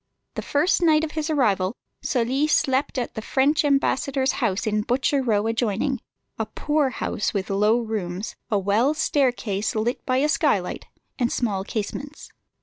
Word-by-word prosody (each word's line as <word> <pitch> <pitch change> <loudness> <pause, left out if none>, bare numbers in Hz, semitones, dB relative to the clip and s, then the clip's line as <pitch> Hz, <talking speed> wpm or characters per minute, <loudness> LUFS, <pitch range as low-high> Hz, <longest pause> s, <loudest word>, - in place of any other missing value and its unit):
The - - -4
first 315 +6 +1
night 315 -2 +4
of 315 - -2
his 310 0 -3
arrival 210 -9 +1 0.3
Sully 260 +4 +1
slept 270 -2 +1
at 245 - -2
the 220 - -5
French 280 +7 +2
ambassador's 275 -1 +1
house 205 -4 0
in 215 -1 +1
Butcher 265 +5 +1
Row 215 -5 +1
adjoining, 230 +3 0 0.4
a 220 - -1
poor 295 +5 0
house 215 -4 -2
with 195 0 -2
low 210 +3 +3
rooms, 210 -4 -4
a 210 - +2
well 210 +9 +2
staircase 245 -10 0
lit 225 +3 -1
by 255 - 0
a 285 +3 +3
skylight, 305 - 0 0.3
and 240 -1 +1
small 205 -6 -1
casements. 275 +8 -5
245 Hz, 155 wpm, -24 LUFS, 210-280 Hz, 0.4 s, night